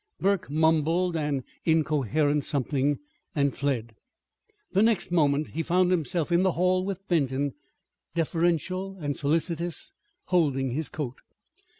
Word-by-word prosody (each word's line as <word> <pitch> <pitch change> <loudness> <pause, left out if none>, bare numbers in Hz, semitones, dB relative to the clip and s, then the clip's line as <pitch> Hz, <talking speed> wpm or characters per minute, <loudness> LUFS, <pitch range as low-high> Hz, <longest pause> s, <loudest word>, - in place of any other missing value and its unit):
Burke 195 -3 +1
mumbled 160 +3 +2
an 145 -4 -1 0.2
incoherent 150 -2 +2
something 140 0 0 0.4
and 140 -2 +1
fled. 120 -6 -2 0.8
The 195 - +3
next 220 -5 +2
moment 150 -3 +2
he 165 - -3
found 180 +2 +2
himself 165 -1 0
in 170 +1 +4
the 185 -2 +2
hall 185 +1 +2
with 195 0 -5
Benton, 140 -4 +1 0.6
deferential 175 +3 0
and 145 -3 -2
solicitous, 165 +3 -1 0.3
holding 140 -8 +1
his 155 +5 -2
coat. 135 -5 -5
160 Hz, 120 wpm, -27 LUFS, 145-180 Hz, 0.8 s, in